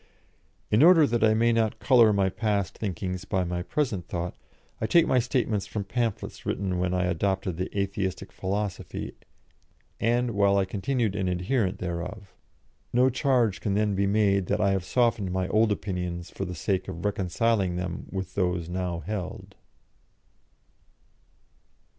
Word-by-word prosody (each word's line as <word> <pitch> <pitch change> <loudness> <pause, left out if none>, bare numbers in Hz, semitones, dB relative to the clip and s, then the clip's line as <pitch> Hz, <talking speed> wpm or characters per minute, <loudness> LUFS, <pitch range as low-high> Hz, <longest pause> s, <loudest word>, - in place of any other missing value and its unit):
In 105 - +4
order 165 -1 +8
that 120 -3 0
I 110 0 +5
may 115 +1 +3
not 110 -2 +1
colour 120 -5 +5
my 100 -2 +2
past 100 0 -1
thinkings 95 -2 -4
by 95 -2 0
my 90 0 -2
present 105 - -2
thought, 90 -3 -4 0.5
I 110 - +1
take 170 +8 +5
my 130 - +3
statements 120 -4 0
from 105 - -3
pamphlets 115 +2 -3
written 95 -2 -2
when 90 0 0
I 90 0 +1
adopted 95 0 -1
the 90 - -2
Atheistic 100 -1 -2
philosophy 100 0 -4 0.9
and 120 +1 +1
while 100 -1 +3
I 95 - +2
continued 105 +2 -1
an 95 -2 -1
adherent 90 +3 0
thereof. 90 +3 -5 0.6
No 125 +2 +4
charge 125 -6 +1
can 100 -2 0
then 105 0 +1
be 100 +1 +1
made 100 -2 +2
that 105 - 0
I 100 -2 +3
have 95 -2 0
softened 115 -6 +1
my 95 0 -1
old 110 0 +3
opinions 90 -4 -3
for 95 - -4
the 90 -1 -5
sake 95 +4 -1
of 85 - -6
reconciling 100 0 +1
them 90 -1 -4
with 95 -1 -5
those 90 -3 -1
now 90 -2 -3
held. 95 +1 -5
100 Hz, 155 wpm, -27 LUFS, 90-110 Hz, 0.9 s, order